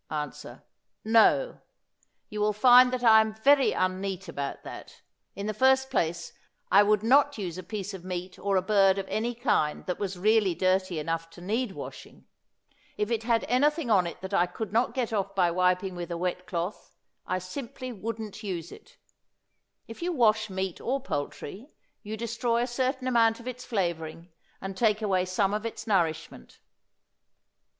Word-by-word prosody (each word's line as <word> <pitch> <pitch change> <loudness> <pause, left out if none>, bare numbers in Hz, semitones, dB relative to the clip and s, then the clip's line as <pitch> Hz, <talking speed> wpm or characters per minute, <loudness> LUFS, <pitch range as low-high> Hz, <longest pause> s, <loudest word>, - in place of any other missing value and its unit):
Answer. 150 -2 -6 0.4
No; 230 - +4 0.7
you 210 0 -5
will 210 0 +2
find 250 +3 +7
that 255 -1 -3
I 220 -2 +8
am 220 0 -3
very 275 +5 +4
un 185 0 0
neat 195 -2 -4
about 140 -1 -5
that. - - -11 0.3
In 200 - -5
the 215 - -2
first 265 +4 +3
place, 170 +1 -1 0.4
I - - +7
would 210 0 +2
not 280 +4 +4
use 185 -4 -5
a - - -4
piece 200 +1 -6
of 190 -2 -8
meat 185 0 -6
or 200 -1 0
a 185 - +1
bird 195 -1 +4
of 195 -1 -3
any 235 +2 -1
kind 155 - 0
that 180 - -3
was 195 -2 -3
really 205 -1 +3
dirty 185 -1 +1
enough 165 +2 -3
to 165 - -15
need 215 +4 -2
washing. - - -10 0.7
If 210 +2 -1
it 225 -2 0
had 230 -1 +1
anything 290 +1 +1
on 185 -4 +4
it 170 - -8
that 190 +1 -7
I 175 -2 +3
could 215 +2 -6
not 235 +4 +1
get 245 -4 -1
off 195 -1 -2
by 180 -3 +3
wiping 180 +2 +1
with 175 -1 -6
a 170 - -3
wet 180 +1 -3
cloth, 175 +3 -5 0.3
I 185 - 0
simply 255 +7 -7
wouldn't 220 0 -6
use 180 -5 -5
it. - - -15 0.9
If 225 - -10
you 355 +1 -1
wash 220 -7 +2
meat 190 -1 -4
or 265 +3 -1
poultry 200 - -5 0.3
you 215 +1 -6
destroy 235 +1 -1
a - - 0
certain 255 +1 -2
amount 230 -2 +3
of 235 - -11
its 250 0 -6
flavoring 170 -4 -3 0.3
and 195 0 -6
take 215 0 +1
away 190 -3 +1
some 190 +2 0
of 210 +1 -2
its 225 -1 -6
nourishment. 165 - -1
205 Hz, 180 wpm, -27 LUFS, 185-235 Hz, 0.9 s, I